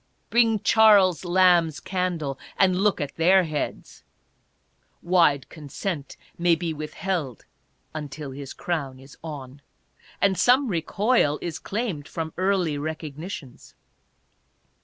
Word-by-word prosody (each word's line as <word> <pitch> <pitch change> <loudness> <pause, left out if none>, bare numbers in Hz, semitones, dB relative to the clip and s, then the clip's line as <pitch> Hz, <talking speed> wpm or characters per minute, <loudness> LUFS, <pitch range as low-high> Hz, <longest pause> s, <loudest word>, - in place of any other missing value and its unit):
Bring 225 -3 +3
Charles 205 -6 +5
Lamb's 175 -3 +3
candle, 175 -7 -3 0.2
and 185 -2 +4
look 205 -2 +2
at 145 -2 -5
their 185 +3 +5
heads! 155 -3 -5 1.0
Wide 170 -6 +3
consent 155 +1 -6 0.2
may 170 -1 +4
be 165 0 -3
withheld, 155 - -4 0.5
until 150 -2 -6
his 140 0 -8
crown 140 -7 -4
is 135 +1 -15
on. 145 -3 -8 0.6
And 195 -2 +2
some 255 +1 +4
recoil 185 - +1
is 170 -2 -5
claimed 195 -9 -4
from 160 -1 -5
early 185 -5 0
recognitions. 155 -2 -7
165 Hz, 110 wpm, -25 LUFS, 145-190 Hz, 1.0 s, Charles